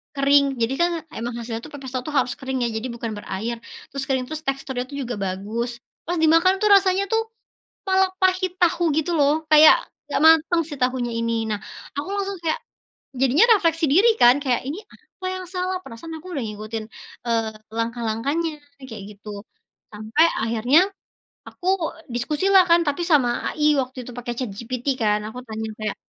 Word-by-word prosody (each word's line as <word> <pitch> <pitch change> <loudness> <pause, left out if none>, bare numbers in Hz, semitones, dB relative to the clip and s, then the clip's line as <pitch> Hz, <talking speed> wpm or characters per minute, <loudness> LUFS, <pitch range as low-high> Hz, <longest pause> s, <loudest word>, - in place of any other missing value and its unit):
kering. 280 +1 +4 0.2
Jadi 230 +3 +1
kan 345 - +4 0.3
emang 235 +2 -4
hasilnya 230 -1 -4
tuh 305 - -11
pepes 270 -3 -8
tahu 255 -1 -2
tuh 300 - -4
harus 250 - 0
kering 265 0 -3
ya, 235 - +1
jadi 220 +3 -3
bukan 230 -1 -4
berair. 215 +4 -4 0.4
Terus 275 0 -4
kering, 260 -2 0
terus 310 +2 -6
teksturnya 270 -2 -2 0.2
juga 240 -1 -4
bagus. 205 +6 -3 0.4
Pas 350 0 -1
dimakan 330 +4 +5
tuh 425 - +3
rasanya 385 0 +3
tuh 450 0 +3 0.7
malah 380 0 +3
pahit 370 0 +2
tahu 345 0 +3
gitu 315 +3 0
loh. 285 0 +4 0.2
Kayak 310 0 +9 0.3
enggak 285 - -1
mateng 325 +1 +5
si - - -4
tahunya 250 -1 0
ini. 230 0 0 0.2
Nah, 210 - -1 0.4
aku 295 - -3
langsung 395 -1 -3
kayak 325 +7 0 0.6
jadinya 270 - +5
refleksi 330 -4 +1
diri 385 +10 +5
kan 240 +1 +8
kayak, 250 -4 +1
"Ini 295 +7 -4
apa 370 - -12
yang 370 -1 -6
salah?" 370 +1 -1
Perasaan 320 +4 -9
aku 345 - -15
udah 275 - -2
ngikutin, 215 +1 -5 0.4
eee, 225 -1 0 0.3
langkah-langkahnya 235 +8 -1 0.4
kayak 215 -3 -7 0.2
gitu. 210 - -13 0.6
Sampai 215 +9 +1 0.2
akhirnya, 230 +7 +3 0.7
aku 360 - -8 0.4
diskusi 285 +9 -2
lah 380 -1 +8
kan 335 +1 +6
tapi 290 +4 0
sama 265 -6 +5 0.2
AI 300 -1 -1 0.2
waktu 260 +1 -7
itu - - -7
pakai 240 0 -4
ChatGPT 240 +1 -5 0.2
kan. 210 -1 +2
Aku 220 +3 -7
tanya 220 0 -5
kayak 215 -1 -3
265 Hz, 175 wpm, -23 LUFS, 230-330 Hz, 0.7 s, Kayak